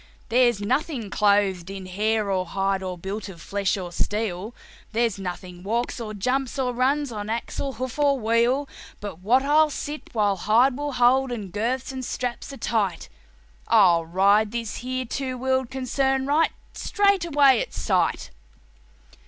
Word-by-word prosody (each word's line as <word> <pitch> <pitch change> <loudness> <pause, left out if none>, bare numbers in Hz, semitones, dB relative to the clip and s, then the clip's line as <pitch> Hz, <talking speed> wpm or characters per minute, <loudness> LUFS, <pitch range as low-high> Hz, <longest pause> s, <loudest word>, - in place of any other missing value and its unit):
There's 240 -2 +3
nothing 250 0 -1
clothed 200 -4 +2
in 195 -1 -7
hair 210 +2 0
or 185 -1 +1
hide, 195 +1 0
or 185 -1 -4
built 195 +3 -5
of 175 -3 -11
flesh 200 +3 -1
or 180 -2 -6
steel, 210 +2 -2 0.4
There's 225 -3 +1
nothing 180 -1 -6
walks 230 +6 -2
or 215 -2 -5
jumps, 255 +6 -1
or 255 -2 0
runs, 270 +3 +1
on 210 -1 -5
axle, 235 +4 -3
hoof 255 +3 -5
or 280 -2 +3
wheel, 235 +5 +2 0.3
But 205 -5 -7
what 240 +8 +3
I'll 305 +2 +4
sit, 295 +1 -6
while 205 -3 +2
hide 235 +8 +3
will 290 +1 -3
hold 255 +1 +3
and 210 -6 -5
girths 240 +6 -2
and 260 -1 -5
straps 250 +1 -4
are 275 - -8
tight; 200 - -1 0.6
I'll 180 -7 +5
ride 200 +5 +3
this 230 -2 -4
here 255 +1 -3
two 260 +1 -3
wheeled 260 0 0
concern 265 +1 0
right 300 +4 +3 0.2
straight 400 -3 +2
away 280 -6 +4
at - - -5
sight." 85 -6 0
230 Hz, 160 wpm, -24 LUFS, 200-265 Hz, 0.6 s, I'll